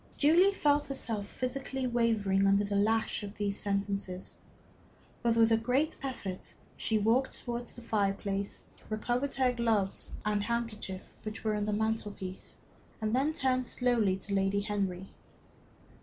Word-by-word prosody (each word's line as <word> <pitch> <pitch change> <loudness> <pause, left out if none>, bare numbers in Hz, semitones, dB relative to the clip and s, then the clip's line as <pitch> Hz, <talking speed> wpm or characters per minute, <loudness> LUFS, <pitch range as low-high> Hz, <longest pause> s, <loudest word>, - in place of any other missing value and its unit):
Julie 340 +7 +6
felt 290 -3 +3
herself 225 -7 -3
physically 265 +2 -3
wavering 220 -5 +2
under 200 +1 +4
the 200 0 -2
lash 220 +2 +2
of 205 0 -7
these 205 -1 0
sentences. 200 -2 -2 0.8
But 235 -1 +2
with 225 0 +5
a 225 - +6
great 250 +7 +1
effort 205 -9 -5 0.2
she 220 - 0
walked 230 +5 +2
towards 240 0 -4
the 240 - -10
fireplace, 200 -2 -1 0.3
recovered 240 +5 -1
her 260 -2 +3
gloves 225 -5 0
and 210 -1 +1
handkerchief, 220 -4 -4
which 215 0 -6
were 215 -1 +1
on 210 -1 0
the 210 - 0
mantel 220 0 0
piece, 185 -1 -7 0.4
and 215 +1 0
then 275 +4 +2
turned 255 -4 +1
slowly 230 -7 +2
to 200 +1 -5
Lady 195 +1 +2
Henry. 195 -2 -2
220 Hz, 145 wpm, -31 LUFS, 200-245 Hz, 0.8 s, Julie